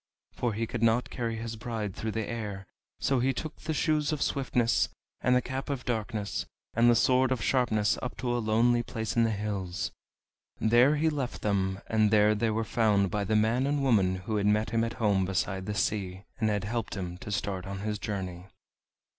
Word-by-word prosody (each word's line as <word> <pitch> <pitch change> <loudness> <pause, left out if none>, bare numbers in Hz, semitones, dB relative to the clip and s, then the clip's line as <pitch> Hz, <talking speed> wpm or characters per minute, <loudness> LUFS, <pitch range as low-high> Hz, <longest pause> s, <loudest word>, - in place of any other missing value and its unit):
For 120 -3 -1
he 115 +2 -1
could 115 0 -5
not 115 +2 +2
carry 115 -2 -2
his 115 0 -5
bride 110 -3 -4
through 110 -1 -3
the 110 -2 -2
air, 105 -4 -5 0.3
so 135 -2 +1
he 130 +2 +2
took 155 +5 -5
the 160 - -4
Shoes 155 0 +1
of 155 - -1
Swiftness, 125 -4 +1 0.3
and 125 +1 +3
the 125 - +2
Cap 130 +2 -4
of 135 -3 -3
Darkness, 110 -3 -2 0.3
and 120 +1 +5
the 120 - +5
Sword 130 +2 +3
of 125 -5 0
Sharpness 110 -5 +2
up 125 - -5
to 120 -1 -1
a - - +1
lonely 120 +2 +3
place 110 -4 -4
in 115 -1 +4
the - - +1
hills. 100 -4 -3 0.7
There 120 +6 +5
he 160 +2 +2
left 135 -5 -4
them, 95 -2 0
and 110 -1 +2
there 105 0 +5
they 110 +2 0
were 110 +1 0
found 105 -3 +2
by 105 -1 0
the 110 - +1
man 115 +5 +2
and 145 -1 0
woman 100 -8 +3
who 95 +4 -3
had 100 0 +1
met 105 +1 +2
him 115 0 +2
at 115 - -2
home 100 -4 +2
beside 95 0 -2
the 105 - -2
sea, 95 -3 -1 0.2
and 110 -2 +2
had 105 -2 0
helped 115 +1 -3
him 90 -2 -5
to 105 - -7
start 95 -2 -2
on 100 0 -5
his 105 0 -2
journey. 95 -3 -4
110 Hz, 210 wpm, -29 LUFS, 100-120 Hz, 0.7 s, and